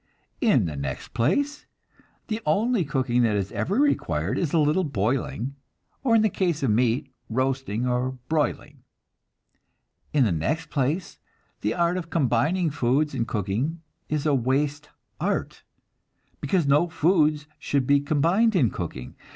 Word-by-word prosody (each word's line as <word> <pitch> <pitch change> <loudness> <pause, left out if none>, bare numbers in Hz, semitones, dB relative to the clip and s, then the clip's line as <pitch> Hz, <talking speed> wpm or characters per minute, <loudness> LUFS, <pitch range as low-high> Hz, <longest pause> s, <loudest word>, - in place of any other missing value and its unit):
In 205 - +4
the 80 -3 -4
next 70 -2 -5
place, 285 - 0 0.6
the 220 0 -3
only 215 +6 +2
cooking 130 -5 0
that 115 -3 +2
is 100 0 -2
ever 110 - -1
required 95 - +1
is 165 -5 -1
a - - +2
little 155 +4 +3
boiling, 125 - -2 0.5
or 235 -4 +3
in 220 - +4
the - - +5
case 175 -6 -1
of 125 - +2
meat, 125 +4 +1 0.2
roasting 130 -2 -1
or 125 +1 0
broiling. 145 -3 -1 1.3
In 145 -3 +3
the 110 - +2
next 155 - -2
place, 150 +6 -1 0.4
the 105 +2 -1
art 170 +1 +1
of 170 -2 -5
combining 155 +4 +1
foods 140 +3 +1
in 120 -4 -1
cooking 115 - -2 0.3
is 150 -1 -1
a 150 - +3
waste 140 +3 0 0.3
art, - - -2 0.8
because 160 +3 +1
no 145 +5 +3
foods 155 -3 +2
should 140 -3 0
be 140 +2 +4
combined 170 +10 +2
in 130 - +3
cooking. 70 -8 -6
145 Hz, 145 wpm, -25 LUFS, 120-170 Hz, 1.3 s, the